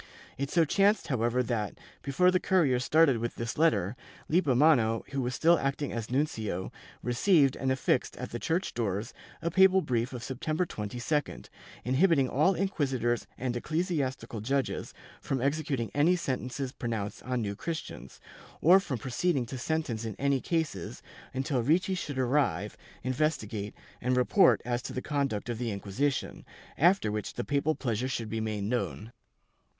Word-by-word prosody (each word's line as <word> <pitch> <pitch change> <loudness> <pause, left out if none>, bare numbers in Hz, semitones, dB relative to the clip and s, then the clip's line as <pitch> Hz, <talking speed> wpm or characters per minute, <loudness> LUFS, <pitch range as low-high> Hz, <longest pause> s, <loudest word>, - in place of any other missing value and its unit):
It 140 +1 -3
so 165 0 +3
chanced 195 +1 +2
however 125 -1 +1
that, 110 -5 -2 0.2
before 180 +7 +3
the 185 - +2
courier 155 -12 +2
started 145 -2 +4
with 120 +1 -3
this 115 0 -4
letter, 110 - +2 0.3
Lippomano, 135 -8 +3
who 135 -1 -1
was 125 0 -2
still 170 +1 +4
acting 140 +1 -2
as 115 -1 -4
nuncio, 110 - -1 0.3
re 120 - -1
ceived 140 -1 +4
and 130 - -1
affixed 130 - 0
at - - -6
the 120 - -4
church 170 +8 -1
doors 110 0 -2 0.3
a 170 - 0
papal 190 +1 +5
brief 120 -1 -1
of 125 -3 -6
September 155 +7 -2
22d, 125 +5 -3 0.4
inhibiting 135 +2 +3
all 155 +9 +2
inquisitors 135 - 0
and 125 -1 -2
ecclesiastical 135 - -2
judges 135 +4 -1 0.3
from 135 - -2
exe 140 +5 +1
cuting 135 -7 -2
any 160 +5 +4
sentences 130 -4 -3
pronounced 115 -5 -4
on 125 -2 -2
New 100 -1 -3
Christians, 160 +8 -6 0.4
or 180 +5 +7
from 145 -9 -3
proceeding 130 +4 0
to 130 +3 -6
sentence 140 -6 -2
in 110 -3 -4
any 140 -1 +1
cases, 165 -3 -2 0.3
until 130 -1 -1
Ricci 175 +9 +2
should 150 -7 -4
arrive, 125 - +1 0.3
investigate 120 -6 -1 0.3
and 125 +1 +1
report 125 - +4
as 120 0 -1
to - - -6
the 130 - -3
conduct 140 -9 -1
of 120 -2 -3
the 120 -2 -2
Inquisition, 110 +7 -2 0.3
after 175 - +3
which 105 0 -4
the 120 - -2
papal 145 +4 0
pleasure 120 -1 -2
should 115 -4 -3
be 110 +1 -2
made 105 -2 -2
known. 115 0 -2
130 Hz, 160 wpm, -29 LUFS, 115-155 Hz, 0.4 s, or